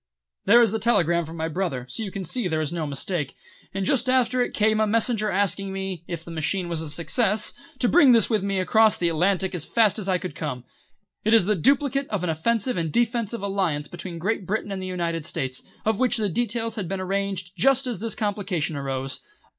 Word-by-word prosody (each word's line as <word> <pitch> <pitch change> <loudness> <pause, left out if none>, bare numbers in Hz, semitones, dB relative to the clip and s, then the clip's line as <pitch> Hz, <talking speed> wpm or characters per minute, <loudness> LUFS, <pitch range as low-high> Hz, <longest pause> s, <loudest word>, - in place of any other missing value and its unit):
"There 235 +4 +7
is 225 - +2
the 225 - -1
telegram 170 -7 +2
from 165 +2 -9
my 160 0 -2
brother, 165 -7 -3
so 225 - -6
you 210 - -3
can 190 0 -6
see 220 +4 0
there's 155 -2 -1
no 165 -3 -2
mistake, 145 +1 -3 0.4
and 195 0 -3
just 255 +2 +2
after 255 -1 +2
it 245 - -2
came 215 0 +2
a 215 - +2
messenger 220 0 +1
asking 195 0 +1
me, 190 -3 -5
if 170 -2 -6
the 170 - -9
machine 165 +3 -2
was 170 -2 -2
a 160 - -2
success, 210 - +2 0.2
to 250 - +1
bring 290 -2 +6
this 230 -4 +6
with 215 -4 +1
me 195 0 -1
across 220 +3 +4
the 170 - +1
Atlantic 185 +3 +1
as 175 -4 -2
fast 220 +2 +2
as 200 -2 -3
I 185 - +3
could 180 0 -6
come. 125 -6 -5 0.6
It 220 +2 +4
is 220 - +4
the 210 +2 +2
duplicate 275 - +2
of 205 -4 -2
an 175 - 0
offensive 230 +9 0
and 165 -2 -1
defensive 235 - 0
alliance 185 -7 -1
between 175 -1 -7
Great 190 +2 -2
Britain 210 0 -2
and 190 -1 -4
the 185 - -5
United 170 -3 -2
States, 135 -5 -3 0.2
of 220 -1 +1
which 255 -2 +2
the 210 -2 0
details 230 +3 -1
had 195 -5 -3
been 195 +2 -3
arranged 190 -1 -2
just 270 0 +3
as 245 -7 -3
this 225 +1 -2
complication 200 -8 -2
arose. 135 -1 -3
195 Hz, 220 wpm, -24 LUFS, 170-225 Hz, 0.6 s, There